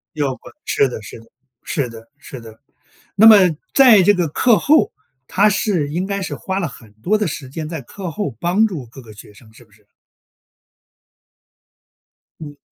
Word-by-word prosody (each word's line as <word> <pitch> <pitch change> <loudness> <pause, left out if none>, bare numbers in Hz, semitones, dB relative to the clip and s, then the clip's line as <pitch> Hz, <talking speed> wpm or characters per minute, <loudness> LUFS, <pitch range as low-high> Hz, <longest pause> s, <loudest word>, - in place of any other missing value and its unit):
要 145 -3 -1
不 - - -20 0.2
是 140 - +1
的， 120 - -8
是 110 - -11
的， 115 - -19 0.4
是 140 -6 -2
的， 115 0 -13
是 130 -3 -11
的。 110 -1 -14 0.6
那 205 +2 +5
么 220 -2 +10 0.4
在 240 -8 +6
这 205 +3 +5
个 180 -4 -1
课 225 - +2
后， 310 +2 +3 0.4
她 205 +2 +3
是 195 -7 -1
应 175 +5 -3
该 200 0 -4
是 185 - -5
花 190 0 -4
了 175 - -2
很 115 -5 -14
多 185 - -1
的 210 - -1
时 140 -4 -7
间 155 +2 -6
在 160 -4 -6
课 180 +7 -8
后 150 - -5
帮 190 +8 +2
助 155 - -7
各 130 +4 -14
个 110 -3 -14
学 105 0 -15
生， 110 +2 -19
是 120 - -18
不 110 - -33
是？ 105 0 -26 2.6
嗯。 145 -2 -10
155 Hz, 200 characters per minute, -18 LUFS, 120-200 Hz, 2.6 s, 么